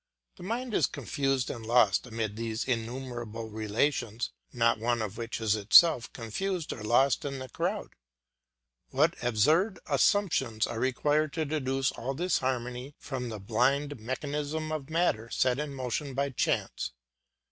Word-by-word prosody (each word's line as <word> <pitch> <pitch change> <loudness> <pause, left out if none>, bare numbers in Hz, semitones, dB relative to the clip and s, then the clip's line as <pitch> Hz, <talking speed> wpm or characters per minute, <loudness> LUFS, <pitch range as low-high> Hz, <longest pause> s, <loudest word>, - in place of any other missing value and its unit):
The - - -13
mind 230 +5 -3
is - - +3
confused 135 -3 -1
and 115 - -7
lost 115 -1 +3
amid 110 -3 -3
these 115 0 -2
innumerable 120 -2 -4
relations, 110 +2 -1 0.2
not 115 -2 +2
one 120 +1 +1
of 110 -2 -3
which 115 0 -4
is 110 -2 +2
itself 115 +5 +6
confused 165 - -3
or 115 - -9
lost 120 +5 +3
in 140 -1 -3
the 130 0 -6
crowd. - - -2 1.0
What 155 +6 +3
absurd 155 - +3
assumptions 135 - +2
are 120 -1 -4
required 145 +4 +1
to 160 -2 -1
deduce 135 -2 0
all 135 +3 -4
this 175 +4 +1
harmony 125 +1 -3
from 125 -3 -5
the 110 -2 -6
blind 130 +7 +1
mechanism 145 +6 -3
of 155 -3 -4
matter 160 -9 +1
set 130 +2 +1
in 150 -1 -3
motion 130 +2 -3
by 140 0 0
chance! 115 - -1
130 Hz, 145 wpm, -29 LUFS, 115-145 Hz, 1.0 s, itself